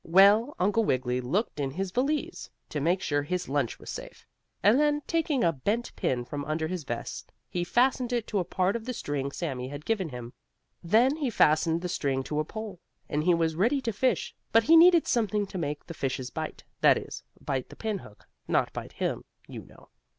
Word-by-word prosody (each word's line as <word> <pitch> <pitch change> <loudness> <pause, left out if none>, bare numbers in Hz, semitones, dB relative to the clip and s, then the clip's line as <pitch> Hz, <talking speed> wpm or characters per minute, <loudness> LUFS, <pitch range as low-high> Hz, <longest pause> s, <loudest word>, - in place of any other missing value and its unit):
Well, 200 - +5
Uncle 205 +5 +2
Wiggily 125 - 0
looked 155 - -1
in 140 -2 0
his 185 +6 -3
valise, 300 - -1 0.2
to 150 - -3
make 175 +5 +1
sure 145 -1 +1
his 180 +5 -3
lunch 140 -3 -1
was - - -8
safe, - - -9 0.4
and 210 +7 +6
then, 295 0 +2
taking 315 -5 0
a 170 - +4
bent 205 - -2
pin 120 -1 -1
from 145 +3 -5
under 155 +1 -1
his 180 -1 -4
vest, 120 -2 -5 0.2
he 175 - -1
fastened 245 +5 +2
it 240 -3 0
to 205 - -1
a - - +1
part 185 +3 0
of 230 -1 -4
the 255 - -3
string 140 -5 -3
Sammie 130 -6 -4
had 145 +2 -8
given 200 -7 0
him. 125 -2 -8 0.5
Then 235 - +4
he 285 -5 -1
fastened 165 -4 +3
the - - -1
string 135 -5 -1
to 150 +2 -2
a - - +2
pole, 210 +2 -7 0.3
and 150 +1 -1
he 180 -1 +5
was 165 -1 +1
ready 235 - +2
to 230 -3 -2
fish, 255 +5 0 0.2
but 225 0 +5
he 325 +7 +6
needed 340 0 +7
something 215 -3 +1
to 190 -1 -6
make 145 -2 -3
the 170 - -7
fishes 130 -4 -3
bite - - -5 0.2
that - - +6
is, - - -7 0.2
bite 130 -2 -3
the - - -11
pinhook, 200 - -6 0.2
not - - +1
bite - - -7
him, - - -2 0.2
you - - -8
know. - - -18
180 Hz, 210 wpm, -28 LUFS, 145-230 Hz, 0.5 s, needed